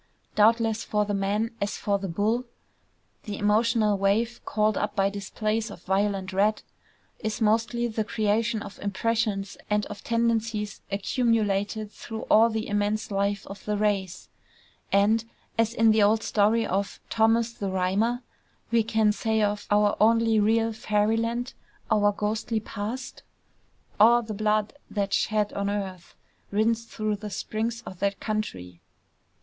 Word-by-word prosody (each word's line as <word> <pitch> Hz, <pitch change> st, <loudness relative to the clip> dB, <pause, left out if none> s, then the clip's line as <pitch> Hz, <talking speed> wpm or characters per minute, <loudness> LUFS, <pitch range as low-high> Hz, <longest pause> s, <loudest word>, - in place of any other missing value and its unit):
Doubtless 225 Hz, +1 st, +3 dB
for 210 Hz, -1 st, 0 dB
the 205 Hz, -, -2 dB
man, 205 Hz, +3 st, 0 dB
as 200 Hz, +1 st, -1 dB
for 200 Hz, -1 st, 0 dB
the 195 Hz, -, -4 dB
bull, 215 Hz, +8 st, 0 dB, 0.8 s
the 205 Hz, -3 st, -4 dB
emotional 215 Hz, 0 st, +2 dB
wave 220 Hz, +5 st, +1 dB
called 215 Hz, 0 st, +1 dB
up 210 Hz, 0 st, -2 dB
by 195 Hz, -1 st, +2 dB
displays 215 Hz, +3 st, -2 dB
of 200 Hz, -, -11 dB
violent 195 Hz, 0 st, 0 dB
red, 210 Hz, +3 st, +2 dB, 0.6 s
is 215 Hz, -1 st, -3 dB
mostly 230 Hz, +2 st, +1 dB
the 220 Hz, -1 st, -2 dB
creation 215 Hz, +1 st, 0 dB
of -, -, -10 dB
impressions 205 Hz, 0 st, -1 dB
and 210 Hz, 0 st, +1 dB
of 200 Hz, -, -9 dB
tendencies 230 Hz, -3 st, -1 dB
accumulated 210 Hz, -1 st, 0 dB
through 220 Hz, 0 st, -7 dB
all 225 Hz, +2 st, +7 dB
the 220 Hz, -1 st, -3 dB
immense 205 Hz, +1 st, -1 dB
life 200 Hz, 0 st, 0 dB
of 195 Hz, 0 st, -10 dB
the 210 Hz, -1 st, -1 dB
race; 200 Hz, -3 st, -1 dB, 0.6 s
and, 215 Hz, +3 st, +3 dB, 0.3 s
as 225 Hz, 0 st, +2 dB
in 225 Hz, -1 st, +4 dB
the 215 Hz, 0 st, +3 dB
old 215 Hz, +2 st, +3 dB
story 220 Hz, +2 st, +2 dB
of 195 Hz, +2 st, -2 dB
Thomas 225 Hz, +1 st, +3 dB
the 200 Hz, -4 st, -4 dB
Rhymer, 200 Hz, +7 st, 0 dB, 0.5 s
we 230 Hz, -1 st, +4 dB
can 220 Hz, -1 st, +2 dB
say 220 Hz, 0 st, 0 dB
of 205 Hz, 0 st, -1 dB
our 205 Hz, 0 st, +3 dB
only 225 Hz, 0 st, +4 dB
real 225 Hz, +2 st, +2 dB
Fairy 215 Hz, 0 st, +1 dB
land, 235 Hz, +2 st, -2 dB, 0.4 s
our 205 Hz, -1 st, +4 dB
ghostly 215 Hz, +2 st, -2 dB
past,... 225 Hz, +5 st, -6 dB, 0.8 s
"_A' 235 Hz, +2 st, +6 dB
the 220 Hz, -, -5 dB
blude 215 Hz, 0 st, 0 dB, 0.2 s
that's 200 Hz, -2 st, 0 dB
shed 210 Hz, -1 st, 0 dB
on 200 Hz, 0 st, -1 dB
earth 190 Hz, -4 st, -5 dB, 0.3 s
Rins 225 Hz, +3 st, +1 dB
through 215 Hz, -2 st, -2 dB
the 210 Hz, +1 st, -7 dB
springs 225 Hz, +3 st, -3 dB
o' -, -, -6 dB
that 200 Hz, +2 st, -2 dB
Countrie. 95 Hz, -, -4 dB
215 Hz, 145 wpm, -26 LUFS, 205-225 Hz, 0.8 s, all